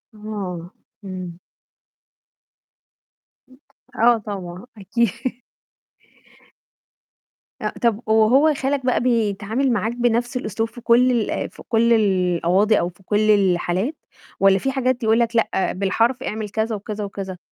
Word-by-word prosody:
آه، 195 Hz, -5 st, -6 dB, 0.3 s
إمم. 185 Hz, -3 st, -7 dB, 2.6 s
آه، 235 Hz, 0 st, +4 dB
طبعًا 190 Hz, -3 st, -7 dB
أكي 235 Hz, +5 st, -2 dB, 2.2 s
أ -, -, -1 dB
طَب 230 Hz, -3 st, +2 dB
وهو 230 Hz, +8 st, +4 dB
خالك 270 Hz, -1 st, -2 dB
بقى 255 Hz, -, +2 dB
بيتعامل 230 Hz, +1 st, 0 dB
معاك 225 Hz, +1 st, -1 dB
بنفس 240 Hz, +1 st, 0 dB
الأسلوب 225 Hz, -1 st, -3 dB
في 240 Hz, +1 st, -12 dB
كلّ 245 Hz, +2 st, +4 dB
ال 235 Hz, -4 st, 0 dB
آآ -, -, -2 dB
في -, -, -14 dB
كلّ 235 Hz, +1 st, +3 dB
القواضي، 190 Hz, 0 st, +2 dB
أو 175 Hz, -, -1 dB
في 180 Hz, +2 st, -21 dB
كلّ 210 Hz, +3 st, +1 dB
الحالات، 190 Hz, -, +1 dB, 0.4 s
والّا 195 Hz, 0 st, +5 dB
في 270 Hz, -, -1 dB
حاجات 255 Hz, -2 st, -1 dB
يقول 220 Hz, +1 st, +3 dB
لك 235 Hz, 0 st, 0 dB
لأ، 220 Hz, -4 st, +1 dB
بالحرف 230 Hz, +7 st, 0 dB
اعمل 215 Hz, -3 st, -4 dB
كذا، 220 Hz, +2 st, -1 dB
وكذا، 210 Hz, +1 st, -5 dB
وكذا؟ 195 Hz, -2 st, -6 dB
220 Hz, 125 wpm, -21 LUFS, 195-240 Hz, 2.6 s, والّا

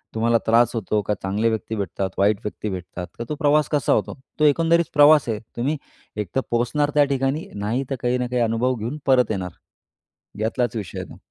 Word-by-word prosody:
तुम्हाला 115 Hz, +1 st, +3 dB
त्रास 115 Hz, +1 st, +4 dB
होतो 105 Hz, -1 st, 0 dB
का 105 Hz, -, 0 dB
चांगले 105 Hz, +4 st, +1 dB
व्यक्ती 110 Hz, 0 st, -3 dB
भेटतात, 95 Hz, -1 st, -3 dB
वाईट 100 Hz, +1 st, +3 dB
व्यक्ती 105 Hz, 0 st, -4 dB
भेटतात 90 Hz, -1 st, -6 dB
का -, -, -2 dB
तो 150 Hz, -, -2 dB
प्रवास 150 Hz, -1 st, +2 dB
कसा 150 Hz, -2 st, +2 dB
होतो. -, -, -1 dB, 0.2 s
तो 155 Hz, -, +4 dB
एकंदरीत 165 Hz, +3 st, +3 dB
प्रवास 150 Hz, 0 st, +6 dB
आहे. 110 Hz, -2 st, -1 dB, 0.2 s
तुम्ही 140 Hz, +6 st, 0 dB, 0.4 s
एक 105 Hz, -2 st, -2 dB
तर 135 Hz, -, +3 dB
पोहोचणार 120 Hz, +5 st, +1 dB
त्या 145 Hz, -, +6 dB
ठिकाणी. 135 Hz, +4 st, -1 dB
नाही 110 Hz, +6 st, -1 dB
तर 135 Hz, -, -1 dB
काही 125 Hz, +1 st, +1 dB
ना 125 Hz, 0 st, -2 dB
काही 125 Hz, 0 st, -1 dB
अनुभव 115 Hz, +3 st, +1 dB
घेऊन 120 Hz, +6 st, -4 dB
परत 125 Hz, -4 st, +4 dB
येणार. 90 Hz, -3 st, -3 dB, 0.9 s
यातलाच 120 Hz, +3 st, -1 dB
विषय 100 Hz, -5 st, -5 dB
आहे -, -, -7 dB
तो. -, -, -12 dB
120 Hz, 200 wpm, -22 LUFS, 105-140 Hz, 0.9 s, प्रवास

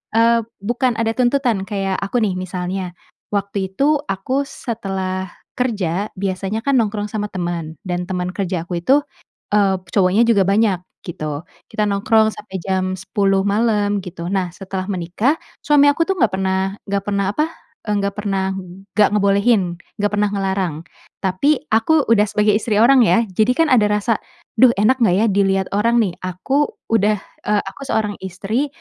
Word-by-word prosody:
Eee, 230 Hz, +1 st, +5 dB, 0.2 s
bukan 240 Hz, +2 st, 0 dB
ada 225 Hz, 0 st, 0 dB
tuntutan, 240 Hz, -5 st, +1 dB
kayak 195 Hz, -2 st, -2 dB
aku 220 Hz, +4 st, 0 dB
nih 195 Hz, -3 st, +1 dB
misalnya, 180 Hz, 0 st, -4 dB, 0.4 s
waktu 200 Hz, -1 st, -1 dB
itu 285 Hz, +7 st, +2 dB
aku 260 Hz, +9 st, -1 dB
setelah 190 Hz, -7 st, -4 dB, 0.3 s
kerja 205 Hz, -6 st, -1 dB
biasanya 195 Hz, +3 st, -3 dB
kan 275 Hz, -2 st, +3 dB
nongkrong 210 Hz, -2 st, -1 dB
sama 210 Hz, -1 st, -2 dB
teman 170 Hz, -4 st, -4 dB
dan 180 Hz, -1 st, -3 dB
teman 180 Hz, -1 st, -2 dB
kerja 185 Hz, -3 st, -2 dB
aku 175 Hz, 0 st, -3 dB
itu, 270 Hz, +12 st, +3 dB, 0.5 s
eee, 200 Hz, -2 st, +3 dB, 0.2 s
cowoknya 195 Hz, +3 st, +3 dB
juga 210 Hz, -4 st, +4 dB
banyak, 200 Hz, -2 st, +3 dB, 0.3 s
gitu. 155 Hz, -4 st, -4 dB, 0.3 s
Kita 210 Hz, -, 0 dB
nongkrong 220 Hz, +2 st, +3 dB
sampai 190 Hz, -3 st, -7 dB
jam 185 Hz, -1 st, -1 dB
10.00 195 Hz, 0 st, +1 dB
malam, 205 Hz, -1 st, +1 dB
gitu. 170 Hz, -2 st, -7 dB
Nah 190 Hz, -2 st, 0 dB
setelah 190 Hz, -1 st, -5 dB
menikah, 190 Hz, -, 0 dB, 0.3 s
suami 290 Hz, -1 st, +5 dB
aku 315 Hz, +3 st, +1 dB
tuh 385 Hz, -, +1 dB
enggak 220 Hz, -, +2 dB
pernah 190 Hz, 0 st, 0 dB, 0.3 s
enggak 200 Hz, 0 st, 0 dB
pernah 200 Hz, -1 st, 0 dB
apa, 305 Hz, -, +1 dB, 0.4 s
eee, 210 Hz, -, +1 dB
nggak 200 Hz, 0 st, -2 dB
pernah 195 Hz, -2 st, -1 dB, 0.5 s
enggak 210 Hz, -, +6 dB
ngebolehin, 200 Hz, +1 st, +3 dB, 0.4 s
enggak 205 Hz, 0 st, +1 dB
pernah 210 Hz, 0 st, +2 dB
ngelarang, 190 Hz, -4 st, -1 dB, 0.5 s
tapi 270 Hz, +12 st, +2 dB
aku 280 Hz, +7 st, +3 dB
udah 210 Hz, -2 st, +5 dB
sebagai 210 Hz, 0 st, +2 dB
istri 215 Hz, -1 st, -1 dB
orang 255 Hz, +2 st, +6 dB
ya, 230 Hz, +2 st, +4 dB
jadi 215 Hz, +6 st, +2 dB
kan 330 Hz, -, +4 dB
ada 215 Hz, -4 st, +5 dB
rasa, 210 Hz, +2 st, +1 dB, 0.4 s
"Duh 250 Hz, -2 st, +7 dB
enak 255 Hz, +6 st, +3 dB
gak 180 Hz, -5 st, +4 dB
ya 210 Hz, +4 st, +3 dB
dilihat 195 Hz, -1 st, +2 dB
orang 230 Hz, +3 st, +2 dB
nih? 190 Hz, -, -1 dB
Aku 265 Hz, +11 st, -1 dB, 0.2 s
udah, 210 Hz, -1 st, +3 dB, 0.3 s
eee, 210 Hz, -1 st, +2 dB
aku 195 Hz, +8 st, -9 dB
seorang 210 Hz, -2 st, 0 dB
istri 200 Hz, +9 st, -2 dB
200 Hz, 160 wpm, -19 LUFS, 190-225 Hz, 0.5 s, Duh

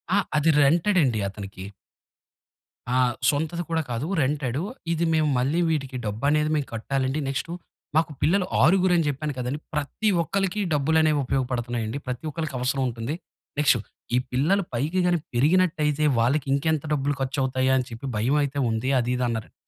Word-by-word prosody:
ఆ! -, -, +4 dB, 0.2 s
అది 150 Hz, +2 st, +3 dB
రెంటెడండి 155 Hz, -, +3 dB
అతనికి. 95 Hz, -1 st, -8 dB, 1.3 s
ఆ! -, -, +4 dB, 0.3 s
సొంతది 160 Hz, +4 st, -1 dB
కూడా 165 Hz, -1 st, +1 dB
కాదు 120 Hz, +6 st, -2 dB
రెంటెడ్. 135 Hz, -1 st, -1 dB, 0.3 s
ఇది 170 Hz, 0 st, +1 dB
మేము 155 Hz, -2 st, +2 dB
మళ్ళీ 145 Hz, +7 st, +1 dB
వీటికి 135 Hz, -5 st, -2 dB
డబ్బనేది 145 Hz, +9 st, +1 dB
మేం 145 Hz, -3 st, 0 dB
కట్టాలండి. 130 Hz, +5 st, -1 dB
నెక్స్ట్ 135 Hz, +4 st, -3 dB, 0.5 s
మాకు 160 Hz, -1 st, +2 dB
పిల్లలు 185 Hz, +2 st, +3 dB, 0.2 s
ఆరుగురని 180 Hz, -1 st, +4 dB
చెప్పాను 145 Hz, +2 st, -3 dB
కదండీ! 125 Hz, +4 st, -3 dB
ప్రతి 150 Hz, +9 st, -2 dB
ఒక్కళ్ళకి 195 Hz, +4 st, -1 dB
డబ్బులనేవి 155 Hz, +1 st, +3 dB
ఉపయోగపడుతున్నాయండి. 120 Hz, -3 st, -2 dB
ప్రతి 125 Hz, +4 st, -4 dB
ఒక్కళ్ళకి 155 Hz, -3 st, -4 dB
అవసరముంటుంది. 125 Hz, +1 st, -1 dB, 0.4 s
నెక్స్ట్ 140 Hz, -4 st, +4 dB, 0.4 s
ఈ -, -, +4 dB
పిల్లలు 165 Hz, +11 st, +2 dB
పైకి 150 Hz, +10 st, 0 dB
గాని 175 Hz, -1 st, +2 dB
పెరిగినట్టయితే 155 Hz, +1 st, +2 dB, 0.2 s
వాళ్లకి 130 Hz, +5 st, +2 dB
ఇంకెంత 150 Hz, +1 st, +1 dB
డబ్బులు 145 Hz, 0 st, 0 dB
ఖర్చు 135 Hz, +2 st, -2 dB
అవుతాయా? 130 Hz, 0 st, +1 dB
అని 130 Hz, -, 0 dB
చెప్పి 115 Hz, +3 st, -7 dB
భయమయితే 140 Hz, +5 st, +1 dB
ఉంది. 110 Hz, +3 st, -1 dB
అది 120 Hz, 0 st, -1 dB
ఇది 125 Hz, -, -1 dB
అన్నారండి. 115 Hz, -2 st, -4 dB
145 Hz, 145 wpm, -25 LUFS, 125-160 Hz, 1.3 s, ఆ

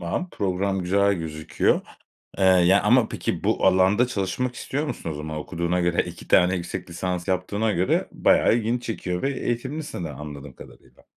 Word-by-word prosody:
Tamam, 90 Hz, -, -3 dB
program 95 Hz, 0 st, -1 dB
güzel 100 Hz, +3 st, +2 dB
gözüküyor, 80 Hz, -2 st, 0 dB, 0.6 s
eee, -, -, +1 dB
yani, 95 Hz, +1 st, +5 dB
ama 115 Hz, +2 st, +4 dB
peki, -, -, -3 dB
bu -, -, +1 dB
alanda 95 Hz, +6 st, +4 dB
çalışmak 120 Hz, +2 st, -2 dB
istiyor 145 Hz, +5 st, -3 dB
musun? 85 Hz, -, -5 dB
O -, -, -3 dB
zaman 75 Hz, +1 st, -5 dB
okuduğuna 85 Hz, +3 st, -2 dB
göre, 85 Hz, -1 st, +1 dB
2 85 Hz, -1 st, -10 dB
tane 90 Hz, +1 st, +4 dB
yüksek 85 Hz, 0 st, -5 dB
lisans 90 Hz, +1 st, -3 dB
yaptığına 100 Hz, +4 st, 0 dB
göre 90 Hz, -1 st, 0 dB
bayağı -, -, +3 dB
ilgini 120 Hz, +1 st, -1 dB
çekiyor 90 Hz, -6 st, -4 dB
ve 135 Hz, -, 0 dB
eğitimlisin 130 Hz, -, -3 dB
de -, -, -5 dB
anladığım 70 Hz, -1 st, -9 dB
kadarıyla. -, -, -16 dB
95 Hz, 165 wpm, -24 LUFS, 85-110 Hz, 0.6 s, yani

